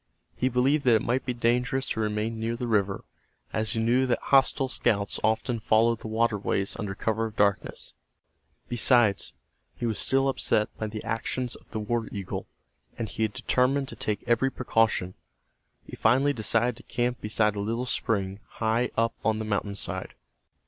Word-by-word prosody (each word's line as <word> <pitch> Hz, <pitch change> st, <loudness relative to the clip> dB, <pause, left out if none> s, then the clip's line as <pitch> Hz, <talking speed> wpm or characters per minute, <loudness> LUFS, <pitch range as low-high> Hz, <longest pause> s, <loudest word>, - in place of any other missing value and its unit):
He 130 Hz, -, +1 dB
believed 135 Hz, +4 st, +2 dB
that 120 Hz, -3 st, +6 dB
it 110 Hz, -, +1 dB
might 130 Hz, +3 st, -1 dB
be 125 Hz, -, 0 dB
dangerous 125 Hz, +3 st, +1 dB
to -, -, -2 dB
remain 110 Hz, +1 st, -1 dB
near 115 Hz, +1 st, -1 dB
the 120 Hz, +1 st, -4 dB
river, 100 Hz, -3 st, +1 dB, 0.5 s
as 110 Hz, 0 st, 0 dB
he 115 Hz, -, -1 dB
knew 120 Hz, +4 st, +3 dB
that 125 Hz, -, +2 dB
hostile 135 Hz, 0 st, +3 dB
scouts 105 Hz, -5 st, 0 dB
often 110 Hz, +2 st, +1 dB
followed 115 Hz, +1 st, +3 dB
the -, -, -7 dB
waterways 110 Hz, -3 st, 0 dB
under 100 Hz, -3 st, -3 dB
cover 110 Hz, +2 st, -1 dB
of 110 Hz, -, -11 dB
darkness. 100 Hz, -1 st, 0 dB, 0.7 s
Besides, 120 Hz, -3 st, +3 dB, 0.4 s
he 120 Hz, -, -4 dB
was 110 Hz, -3 st, -1 dB
still 135 Hz, 0 st, +2 dB
upset 110 Hz, -5 st, 0 dB
by 110 Hz, -, -3 dB
the 110 Hz, 0 st, -6 dB
actions 120 Hz, +2 st, -2 dB
of -, -, -17 dB
the 110 Hz, -, -4 dB
war 115 Hz, +2 st, -1 dB
eagle, 100 Hz, -3 st, -5 dB, 0.5 s
and 115 Hz, -2 st, -3 dB
he 110 Hz, +2 st, 0 dB
determined 130 Hz, +5 st, +1 dB
to -, -, -8 dB
take 110 Hz, -3 st, -2 dB
every 120 Hz, +3 st, +2 dB
precaution. 115 Hz, -7 st, +1 dB, 0.7 s
He -, -, -10 dB
finally 135 Hz, +6 st, +3 dB
decided 115 Hz, +1 st, 0 dB
to -, -, -11 dB
camp 120 Hz, 0 st, 0 dB
beside 105 Hz, 0 st, +1 dB
a -, -, -3 dB
little 115 Hz, +4 st, -1 dB
spring, 100 Hz, -6 st, -1 dB
high 115 Hz, +2 st, +1 dB
up 115 Hz, 0 st, +2 dB
on 110 Hz, -1 st, +2 dB
the 110 Hz, -, -3 dB
mountainside. 100 Hz, -2 st, -3 dB
115 Hz, 170 wpm, -27 LUFS, 105-125 Hz, 0.7 s, that